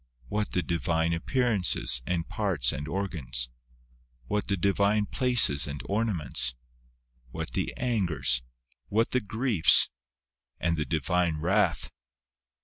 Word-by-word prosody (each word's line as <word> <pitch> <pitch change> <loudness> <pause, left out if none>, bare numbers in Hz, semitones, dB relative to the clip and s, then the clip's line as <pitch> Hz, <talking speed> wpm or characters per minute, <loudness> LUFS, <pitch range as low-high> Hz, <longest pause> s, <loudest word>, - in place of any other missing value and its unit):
what 105 0 -2
the 90 - +1
Divine 80 0 0
appearances, 95 - +1
and 85 -2 -1
parts 90 - 0
and 75 +3 -5
organs? 80 -10 -3 0.8
what 105 +11 -2
the 100 - 0
Divine 100 +3 +2
places 120 - +2
and 70 0 -5
ornaments? 95 - 0 0.7
what - - -6
the - - -1
angers? 90 - +1 0.5
what 115 +3 +1
the 125 - +2
griefs? 110 -3 +4 0.7
and 85 -1 +1
the 75 -2 -2
Divine 80 +2 0
wrath 95 +6 +1
90 Hz, 115 wpm, -28 LUFS, 75-105 Hz, 0.8 s, griefs